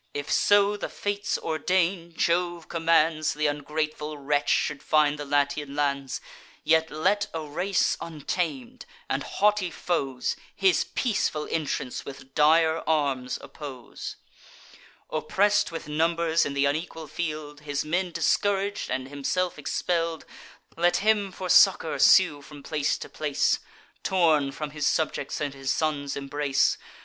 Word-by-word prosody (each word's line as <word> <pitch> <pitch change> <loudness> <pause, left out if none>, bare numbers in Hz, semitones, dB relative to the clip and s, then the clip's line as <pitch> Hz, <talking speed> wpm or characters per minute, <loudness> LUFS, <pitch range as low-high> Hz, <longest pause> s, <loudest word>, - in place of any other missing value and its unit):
If 145 +1 -4
so 205 0 +4
the - - -4
Fates 205 0 -2
ordain, 170 +1 0
Jove 175 -1 0
commands, 165 -2 +2
Th' 150 - -9
ungrateful 150 +1 -2
wretch 145 +1 0
should 150 -2 +1
find 150 -1 +2
the 145 - -4
Latian 145 0 0
lands, 140 -2 -1 0.4
Yet 160 0 +3
let 200 +7 +1
a 160 - -2
race 175 +6 0
untam'd, 180 - -4 0.2
and - - -1
haughty 210 -3 +1
foes, 135 -7 -2 0.2
His 190 -3 +3
peaceful 195 - -1
entrance 150 -5 -2
with 135 -1 -11
dire 160 +2 +4
arms 140 -5 0
oppose: 135 -5 -8 1.0
Oppress'd 205 +6 +2
with 165 -1 -7
numbers 165 +1 +1
in 140 - -5
th' 140 0 +2
unequal 160 +2 -2
field, 150 -2 -5
His 145 -1 -3
men 175 +3 -1
discourag'd, 200 +4 0
and 130 0 -2
himself 165 +5 -2
expell'd, 165 +2 -1 0.5
Let 175 +1 +3
him 210 -3 +3
for 185 0 -6
succour 180 -3 +5
sue 180 -7 +6
from 145 0 -12
place 150 -2 0
to - - -8
place, 150 -2 0 0.4
Torn 160 -7 +2
from 150 +1 -5
his 150 -1 -1
subjects, 160 - -1
and 145 -2 -2
his 135 0 -2
son's 145 -3 -1
embrace. 140 0 +1
155 Hz, 135 wpm, -26 LUFS, 145-175 Hz, 1.0 s, sue